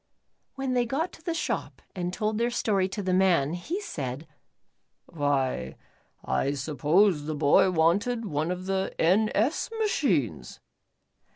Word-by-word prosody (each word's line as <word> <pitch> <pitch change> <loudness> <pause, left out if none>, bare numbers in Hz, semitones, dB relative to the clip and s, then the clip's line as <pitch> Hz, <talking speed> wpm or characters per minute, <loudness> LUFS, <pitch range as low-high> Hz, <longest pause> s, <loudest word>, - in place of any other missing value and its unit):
When 270 -1 -2
they 245 -1 +1
got 310 +8 -1
to - - -14
the 335 -1 -2
shop - - -3 0.2
and 180 -1 -2
told 215 +3 -1
their 235 +1 +2
story 200 -5 0
to 205 +1 -4
the 185 -1 0
man, 175 -6 +3
he 300 - -3
said: 145 - -5 0.8
"Why 135 - -1 0.5
I 140 - 0
supposed 155 +4 +2
the 155 - -2
boy 145 +6 +4
wanted 195 +8 +1
one 155 -3 -1
of 180 0 -4
the 190 0 -2
N. 195 +6 +3
S. 230 +9 +1
machines." 155 - 0
185 Hz, 145 wpm, -27 LUFS, 150-225 Hz, 0.8 s, boy